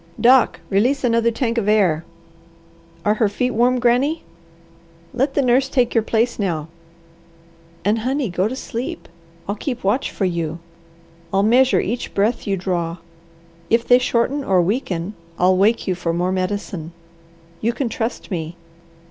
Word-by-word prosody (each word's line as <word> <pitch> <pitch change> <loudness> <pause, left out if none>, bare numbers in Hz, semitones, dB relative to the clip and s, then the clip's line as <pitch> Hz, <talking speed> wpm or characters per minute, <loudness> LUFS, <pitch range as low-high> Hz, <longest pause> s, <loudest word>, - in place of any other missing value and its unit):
Doc, 255 +1 +4
release 250 +8 +2
another 230 -1 +3
tank 235 0 -1
of 205 - -3
air. 185 -7 +3 1.0
Are 210 - +4
her 215 -1 +1
feet 250 +5 -1
warm, 245 +2 +2
Granny? 250 +7 +2 0.9
Let 270 +3 0
the 280 - +3
nurse 255 +2 +3
take 250 -3 +1
your 230 - +3
place 225 +2 0
now. 165 -6 -2 1.2
And, 210 +3 +2
honey, 260 +3 -1
go 185 +3 +1
to 250 - -4
sleep! 245 -2 -5 0.4
I'll 200 - -1
keep 245 +3 -5
watch 210 +8 +1
for 195 - -2
you. 170 -3 -2 0.7
I'll 195 +1 +2
measure 250 +4 +4
each 235 +4 -3
breath 210 +3 0
you 195 -1 0
draw. 175 -2 -2 0.7
If 230 +1 +2
they 245 0 +6
shorten 255 +3 0
or 190 -6 +2
weaken, 185 -1 -1 0.2
I'll 185 +1 +4
wake 210 +5 +2
you 185 - +2
for 175 -2 -2
more 175 +2 0
medicine. 185 -3 -3 0.7
You 230 - +1
can 255 +2 -2
trust 230 0 -4
me! 165 -2 -4
220 Hz, 155 wpm, -20 LUFS, 185-245 Hz, 1.2 s, they